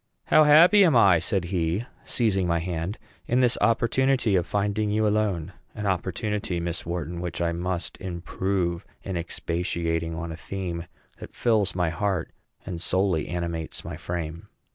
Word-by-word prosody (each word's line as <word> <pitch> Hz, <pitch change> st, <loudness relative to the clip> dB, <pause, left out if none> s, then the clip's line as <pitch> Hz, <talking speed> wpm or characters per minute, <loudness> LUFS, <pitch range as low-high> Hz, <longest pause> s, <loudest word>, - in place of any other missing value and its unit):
"How 155 Hz, -, +6 dB
happy 170 Hz, +7 st, +7 dB
am 165 Hz, -7 st, +4 dB
I," 95 Hz, -7 st, +6 dB
said 95 Hz, +2 st, 0 dB
he, 85 Hz, +5 st, 0 dB, 0.2 s
seizing 95 Hz, -6 st, +1 dB
my 85 Hz, 0 st, +2 dB
hand, 85 Hz, +4 st, -3 dB, 0.3 s
"in 125 Hz, -, +2 dB
this 125 Hz, -2 st, +4 dB
opportunity 120 Hz, 0 st, +2 dB
of 90 Hz, -2 st, +1 dB
finding 105 Hz, +1 st, 0 dB
you 110 Hz, +1 st, +1 dB
alone 100 Hz, -5 st, 0 dB, 0.2 s
an 105 Hz, -2 st, -4 dB
opportunity, 95 Hz, 0 st, -1 dB
Miss 85 Hz, 0 st, -4 dB
Wharton, 85 Hz, 0 st, -3 dB
which 85 Hz, -2 st, -4 dB
I 85 Hz, -1 st, +1 dB
must 85 Hz, +1 st, -3 dB
improve 90 Hz, 0 st, -2 dB, 0.2 s
in 95 Hz, -, -4 dB
expatiating 85 Hz, -1 st, -2 dB
on 85 Hz, 0 st, -5 dB
a -, -, -5 dB
theme 90 Hz, -1 st, -5 dB, 0.3 s
that -, -, -10 dB
fills 110 Hz, -6 st, +2 dB
my 90 Hz, -3 st, +1 dB
heart 95 Hz, -1 st, -1 dB, 0.3 s
and 85 Hz, -2 st, -5 dB
solely 95 Hz, -3 st, +1 dB
animates 85 Hz, -2 st, -4 dB
my -, -, -5 dB
frame!" 85 Hz, -1 st, -5 dB
90 Hz, 155 wpm, -26 LUFS, 85-105 Hz, 0.3 s, happy